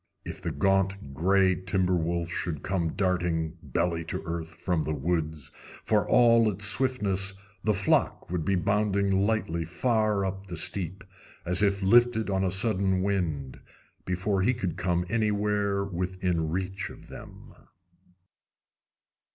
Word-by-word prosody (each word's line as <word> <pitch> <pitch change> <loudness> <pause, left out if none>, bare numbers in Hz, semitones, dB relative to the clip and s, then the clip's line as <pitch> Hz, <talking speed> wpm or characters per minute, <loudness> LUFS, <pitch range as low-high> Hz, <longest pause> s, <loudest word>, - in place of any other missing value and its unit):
If - - -7
the - - -3
gaunt 95 -5 0
gray 95 +5 +3
timber 95 0 -1
wolf 85 0 -1
should 85 -4 -3
come 85 -4 -1
darting, 85 -3 -1
belly 85 -2 -1
to - - -4
earth, 80 -1 -5
from 90 -4 0
the 75 0 -2
woods, 80 0 -2 0.3
for - - +1
all 115 -2 +5
his 105 +2 0
swiftness 100 -6 +2 0.3
the 105 -1 +2
flock 95 -2 0
would 90 -3 -1
be 95 +5 +1
bounding 100 +2 +1 0.2
lightly 85 -7 -1
far 105 +3 0
up 95 +1 -5
the 85 -2 -5
steep, 95 +4 0 0.4
as 90 +2 +1
if 100 -1 +1
lifted 110 +1 +4
on 95 0 +1
a 95 - +1
sudden 95 -1 +2
wind, 80 -10 -2 0.4
before 95 +2 -1
he 125 +6 +2
could 95 -8 -3
come 90 -1 -1
anywhere 105 -2 0
within 90 -3 -2
reach 95 +2 -3
of - - -13
them. - - -12
95 Hz, 140 wpm, -27 LUFS, 85-100 Hz, 0.4 s, all